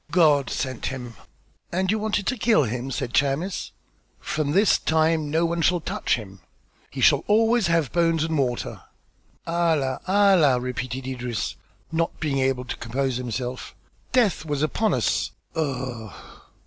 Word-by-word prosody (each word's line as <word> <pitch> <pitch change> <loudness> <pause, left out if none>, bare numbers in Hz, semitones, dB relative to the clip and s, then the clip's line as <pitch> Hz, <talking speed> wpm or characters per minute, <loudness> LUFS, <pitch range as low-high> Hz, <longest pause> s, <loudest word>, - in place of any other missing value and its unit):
"God 150 -7 +4
sent 130 -3 -3
him." 125 -3 -6 0.6
"And 185 +2 +1
you 220 - 0
wanted 210 -2 -1
to 255 - 0
kill 220 - +3
him?" 125 +2 -3
said 125 -1 -3
Chamis. 145 +8 0 0.5
"From 155 -2 -2
this 195 +7 +4
time 160 -1 +1
no 160 +3 +2
one 170 0 -1
shall 175 +2 +3
touch 160 - -1
him." 100 -4 -9 0.5
"He - - -6
shall - - +5
always 225 0 +3
have 165 -6 +1
bones 165 -2 +2
and 160 0 -1
water." 125 -4 -2 0.6
"Allah! 160 -6 +1
Allah!" 185 -9 +4
repeated 125 +1 -4
Idris, 125 -3 -3 0.4
not 165 0 -1
being 145 -3 -1
able 130 -1 0
to - - -5
compose 130 +2 -2
himself. 125 0 -5 0.4
"Death 230 -11 +2
was 145 -2 -2
upon 215 +8 +1
us. - - 0 0.2
Ugh!" 125 - -3
150 Hz, 150 wpm, -24 LUFS, 130-170 Hz, 0.6 s, shall